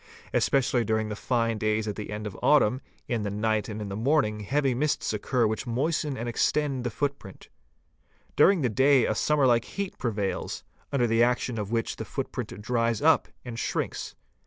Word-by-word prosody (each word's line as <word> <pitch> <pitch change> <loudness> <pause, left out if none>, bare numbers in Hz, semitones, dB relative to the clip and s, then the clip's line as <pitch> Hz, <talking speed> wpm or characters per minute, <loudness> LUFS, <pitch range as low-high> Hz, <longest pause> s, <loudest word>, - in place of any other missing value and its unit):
Especially 135 -3 +2
during 110 -1 0
the 105 - -3
fine 115 -1 0
days 110 0 0
at 105 - -3
the 105 - -6
end 105 0 -5
of 105 - -5
autumn, 130 -4 +4 0.3
in 120 -3 -1
the 105 - -2
night 110 +2 0
and 105 0 -5
— - - -2
in - - -6
the 100 - -4
morning 110 -2 +1
heavy 135 +5 0
mists 145 -2 0
occur 120 +3 +1
which 110 +4 -2
moisten 145 +3 -1
and 115 +2 -4
extend 135 +2 0
the 120 - -1
foot. 140 +5 -2
print; 95 -3 -13 0.9
during 195 -4 +5
the 130 - +2
day 130 +2 +4
a - - +1
summer 145 +5 +2
like 120 -2 +3
heat 200 -1 -5
prevails, 105 -5 -2 0.3
under 135 -4 +2
the 115 0 +2
action 120 -1 +1
of 105 0 -4
which 115 -1 -1
the - - -4
footprint - - -5
dries 115 -1 +1
up 160 +4 +4 0.2
and 115 -2 -6
shrinks. - - -3
115 Hz, 195 wpm, -27 LUFS, 110-135 Hz, 0.9 s, during